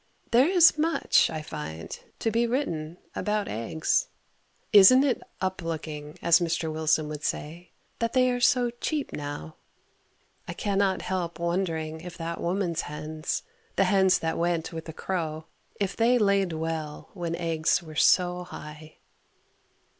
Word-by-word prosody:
There 245 +5 +5
is 345 -4 +6
much, 325 +2 +3
I 155 -1 -5
find, 80 - -7 0.2
to 225 - -1
be 235 +2 +2
written 170 - -2 0.2
about 210 -1 -1
eggs. 115 +9 0 0.7
Isn't 210 +7 +9
it 275 -3 +1 0.2
"up 185 0 -2
looking," 155 -2 -5
as 170 +1 +6
Mr. 165 -2 -1
Wilson 155 -1 +1
would 150 -1 -6
say, 165 +3 -4 0.3
that 230 0 -1
they 255 -1 +4
are 245 - -1
so 245 -1 +3
cheap 285 +5 -3
now? 145 - -6 0.9
I - - -4
cannot 200 -1 0
help 180 -3 -3
wondering 165 -2 -2
if 180 0 -9
that 165 0 -4
woman's 175 -2 -1
hens 155 +1 -4 0.3
the - - +4
hens 190 -1 +4
that 160 0 -2
went 170 -1 -1
with 160 -1 -6
the 160 - -6
crow 160 -3 -3 0.3
if 195 -1 -1
they 235 +2 +4
laid 200 -4 +2
well 160 -1 -4
when 170 -3 -3
eggs 165 0 0
were 155 -1 -10
so 180 +3 +3
high. 155 -2 -10
170 Hz, 145 wpm, -27 LUFS, 155-200 Hz, 0.9 s, Isn't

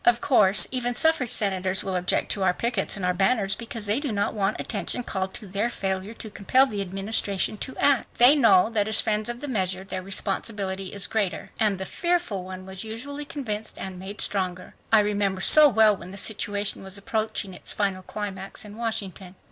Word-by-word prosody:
Of 240 0 +4
course 210 -8 +4
even 245 -1 0
suffrage 320 -6 +3
senators 190 -2 0
will 190 -1 -3
object 180 0 0
to 200 - -1
our 180 -1 +2
pickets 230 -4 0
and 190 - -3
our 180 - +2
banners 195 +1 +2
because 230 -1 -4
they 210 +5 +2
do 285 -4 -3
not 205 -1 -1
want 205 -1 -1
attention 240 +3 -3
called 190 -4 -2
to 220 - -6
their 200 +4 -1
failure 190 +1 -3
to 220 - -9
compel 255 +7 +3
the 210 -7 -4
Administration 195 +1 0
to 260 - -6
act. 280 -3 +3
They 245 +5 +8
know 220 -6 +5
that 210 -2 +1
as 220 0 +5
friends 215 0 0
of 240 +1 -5
the 290 - -4
measure 190 -6 -1
their 190 -1 -5
responsibility 195 0 -3
is 200 -1 -1
greater." 205 -5 -2
And 210 -3 +2
the 190 - -5
"fearful" 345 - -1
one 185 0 -8
was 190 +1 -7
usually 280 +7 -6
convinced 225 -9 -5
and 190 -1 -6
made 195 +2 -7
stronger. 185 -2 -3 0.2
I 220 -1 +6
remember 205 -2 -1
so 300 +8 +7
well 220 -3 +4
when 180 -1 -10
the 195 - -9
situation 205 0 0
was 190 +1 -7
approaching 215 -1 -3
its - - -5
final 195 -2 0
climax 195 0 -6
in 210 +1 -11
Washington. 195 -5 -5
205 Hz, 200 wpm, -25 LUFS, 190-230 Hz, 0.2 s, They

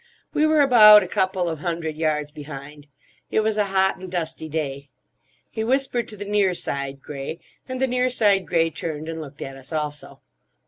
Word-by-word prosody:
We 305 +1 +3
were 310 -1 +4
about 215 -6 +8
a - - -5
couple 185 -1 0
of 160 -2 -3
hundred 165 -2 -3
yards 150 -2 -1
behind; 145 -1 -10 0.4
it - - +2
was 215 0 0
a 210 -1 +2
hot 190 0 +2
and 185 -1 -9
dusty 160 -2 -4
day. 140 -3 -4 0.6
He 220 - -3
whispered 250 -1 0
to 210 - -9
the 205 - -6
near 200 -3 +2
side 140 -3 -4
grey, 140 +3 -6 0.3
and 255 0 -4
the 265 - +3
near 250 0 +1
side 205 -6 +2
grey 165 0 +2
turned 155 -1 -5
and 165 0 -5
looked 145 -1 -8
at 135 - -7
us 135 +2 -12
also. 150 -2 -4
170 Hz, 190 wpm, -23 LUFS, 150-210 Hz, 0.6 s, about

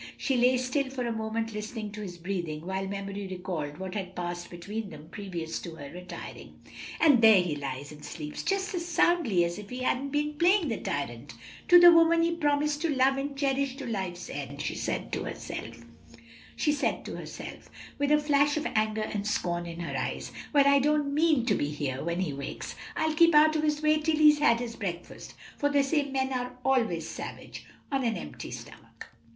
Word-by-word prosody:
She 270 - 0
lay 250 +1 +4
still 255 +2 -1
for 260 -2 -3
a 235 - -1
moment 225 0 -3
listening 210 0 -5
to 210 +1 -7
his 180 -4 -7
breathing, 170 -3 -4
while 190 +1 -2
memory 200 0 -5
recalled 180 -6 -4
what 190 -1 -5
had 190 -3 -5
passed 175 0 -4
between 200 +5 -5
them 155 -1 -12
previous 175 -5 -5
to 165 -2 -8
her 145 -2 -9
retiring. 180 +2 -9 0.4
"And 290 -7 +6
there 220 -3 +8
he 175 -4 0
lies 140 0 -5
and 150 0 -12
sleeps 150 -2 -6
just 390 +1 -1
as 350 -2 -2
soundly 330 - +3
as 170 +3 -4
if 210 - -10
he 250 +1 -5
hadn't 265 +2 0
been 295 +1 -1
playing 350 -2 +4
the 225 - -1
tyrant 120 -4 -4 0.3
to 355 0 +9
the 350 0 +10
woman 330 0 +5
he 335 0 +1
promised 295 -1 +1
to 335 - 0
love 270 -1 +3
and 275 0 -3
cherish 275 -1 0
to 275 -1 -7
life's 190 -6 -4
end," 140 -3 -6
she - - -2
said - - -3
to - - -1
herself, 115 +1 -7 2.1
with 285 0 +1
a 300 - +7
flash 290 0 +3
of 305 - -2
anger 215 0 +1
and 210 -1 -3
scorn 175 -4 -1
in 170 0 -6
her 170 - -4
eyes. - - -3 0.2
"Well, 285 -2 +5
I 280 0 +6
don't 295 0 +1
mean 305 -5 +3
to 230 - +3
be 145 - 0
here 140 -3 -3
when 170 +2 -1
he 165 -6 -1
wakes; 140 0 -6 0.2
I'll 315 0 +1
keep 335 0 +5
out 310 +1 +6
of 310 - +2
his 300 0 0
way 305 0 +4
till 310 0 +1
he's 300 -1 +6
had 235 -5 +4
his 235 -1 -5
breakfast; 175 -4 -6 0.2
for 285 - +2
they 285 -1 +3
say 285 0 0
men 265 0 -1
are 250 0 -3
always 230 -11 +1
savage - - -8 0.2
on 270 -1 0
an 230 -2 0
empty 75 - -7
stomach." - - -10
230 Hz, 200 wpm, -28 LUFS, 175-290 Hz, 2.1 s, the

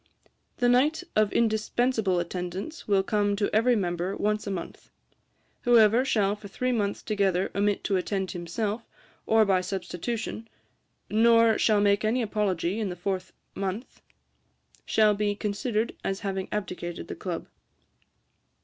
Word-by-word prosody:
'The 245 - +2
night 280 +8 +3
of 215 -1 +3
indispensable 220 -2 +1
attendance 180 - -5
will 195 -2 +3
come 205 -1 +1
to 205 0 -1
every 240 +3 +4
member 180 -1 -2
once 210 0 -1
a - - -1
month. 185 -3 -6 0.7
Whoever 235 0 +5
shall 205 -6 +1
for 205 -1 -11
three 255 +6 -2
months 205 -4 -1
together 195 -3 0
omit 205 0 0
to 195 - +1
attend 190 0 -2
himself, 205 +6 -3 0.4
or 220 0 +5
by 190 -2 +3
substitution, 195 +5 -4 0.6
nor 230 0 +4
shall 210 -2 +3
make 205 +1 +3
any 235 +3 +1
apology 205 -3 -1
in 210 -3 -1
the 180 - -5
fourth 185 +1 -3 0.2
month, 195 +5 -5 0.9
shall 215 -1 +4
be 205 0 0
considered 210 +2 -2
as 195 0 -2
having 195 -2 -3
abdicated 175 - -4
the - - -5
Club. - - -5
205 Hz, 140 wpm, -27 LUFS, 190-225 Hz, 0.9 s, Whoever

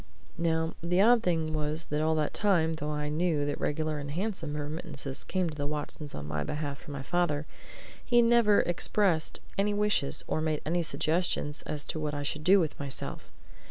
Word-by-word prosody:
Now, 160 -1 +1
the 175 +2 +1
odd 230 +3 +6
thing 160 -4 0
was 155 +1 -2
that 150 0 +1
all 160 0 +2
that 155 -1 0
time, 175 -6 +2
though 150 -1 -4
I 150 0 -2
knew 155 -1 +1
that 145 - -3
regular 155 0 -1
and 140 0 -5
handsome 165 -3 -3
remittances 145 -2 -4
came 185 -2 0
to 155 - -5
the 145 -1 -3
Watsons 150 0 -4
on 75 - -6
my 75 0 -2
behalf 145 - -4
from 145 - -9
my 135 -1 -5
father, 155 -2 0 0.6
he 240 -1 +4
never 230 -3 +5
expressed 175 -1 +2 0.2
any 205 +1 +2
wishes, 205 -9 +1
or 155 - 0
made 155 -1 0
any 175 +3 +1
suggestions, 160 -2 0
as 150 -1 -2
to 160 - -4
what 150 -1 -2
I 145 - -2
should 150 +1 -3
do 195 +4 +6
with 160 -4 -1
myself. 140 -2 -5
155 Hz, 195 wpm, -29 LUFS, 150-175 Hz, 0.6 s, odd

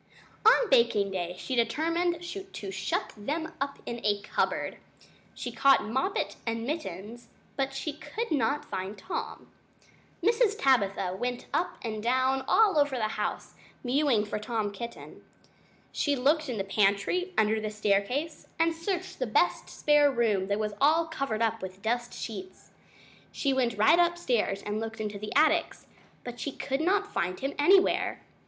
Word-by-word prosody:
On 480 +1 +6
baking 225 -5 +4
day 180 -2 -3
she 260 - -5
determined 335 +8 0
to 345 - -7
shut 190 0 -2
them 310 +9 -4
up 275 0 -2
in 235 0 -5
a 205 -1 +2
cupboard. - - -1 0.6
She - - -5
caught 275 -1 +4
Moppet 265 - -1
and 230 0 -2
Mittens, 235 - -5 0.3
but 270 0 -2
she 290 +2 -3
could 435 +8 -5
not 285 0 +1
find 190 +3 -5
Tom. 365 - -6 0.7
Mrs. 440 +1 +3
Tabitha 200 -8 +2
went 245 +4 -3
up 355 - 0
and 215 -2 -3
down 260 +3 +1
all 405 -8 +4
over 285 -2 +2
the 220 -3 0
house, - - -3 0.3
mewing 255 -4 +2
for 210 - -3
Tom 215 -1 -2
Kitten. 235 +4 -9 0.7
She 290 -1 0
looked 295 +3 +2
in 240 - -3
the 195 - -1
pantry 205 - +1
under 220 0 +3
the 215 - -2
staircase, 210 +9 -1
and 330 0 +2
she 325 - -15
searched 370 +1 -3
the - - -1
best - - +1
spare 295 -1 +4
bedroom 220 -7 +1
that 200 0 0
was 210 -1 -2
all 315 +4 +4
covered 275 -9 -2
up 225 0 0
with 190 +1 -8
dust 240 +2 -1
sheets. 190 -4 -8 0.6
She 275 -2 0
went 245 -4 0
right 220 +11 +5
upstairs 260 - +1
and 210 +1 -2
looked 225 0 -5
into 210 -2 -4
the 210 +1 -6
attics, 315 +3 +2 0.4
but 245 -1 -7
she 285 - -3
could 270 +1 -3
not 400 +4 +1
find 180 +1 -1
him 275 +1 -2
anywhere. 375 +6 +3
245 Hz, 160 wpm, -28 LUFS, 210-310 Hz, 0.7 s, On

